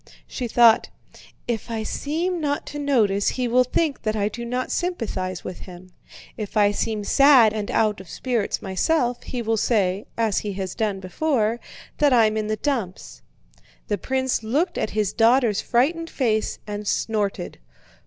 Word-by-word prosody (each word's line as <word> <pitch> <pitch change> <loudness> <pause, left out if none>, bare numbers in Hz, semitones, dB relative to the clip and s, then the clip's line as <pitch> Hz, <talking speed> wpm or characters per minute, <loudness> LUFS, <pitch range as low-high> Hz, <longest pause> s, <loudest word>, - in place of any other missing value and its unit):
She 250 - -5
thought: 230 -1 +5 0.6
"If 235 -1 -3
I 225 -1 -3
seem 330 +9 -2
not 290 0 -1
to 295 - -7
notice 220 -9 +2
he 255 -1 0
will 250 +2 +4
think 280 +3 -1
that 215 -1 -1
I 205 -1 0
do 235 +3 -7
not 250 +2 -3
sympathize 210 - -3
with 185 - -7
him; 180 0 -12 0.5
if 215 0 -5
I 205 -1 +5
seem 210 0 -2
sad 260 -2 +6
and 210 -2 -4
out 210 -3 +1
of 185 - -15
spirits 240 -5 -2
myself, 245 - 0
he 245 -2 -5
will 225 0 0
say 200 -3 0
(as 225 -3 +1
he 205 -1 -4
has 190 -1 -4
done 205 -3 -2
before) 230 - 0 0.4
that 290 -3 +4
I'm 220 -3 +4
in 215 -1 -1
the 215 - 0
dumps." 230 -11 -3 0.7
The 205 -2 0
prince 260 +1 -1
looked 275 - -1
at - - -1
his 210 -2 -1
daughter's 230 -2 +3
frightened 330 +8 +1
face 220 -7 0
and 210 0 -6
snorted. 205 -5 -2
225 Hz, 165 wpm, -23 LUFS, 205-255 Hz, 0.7 s, sad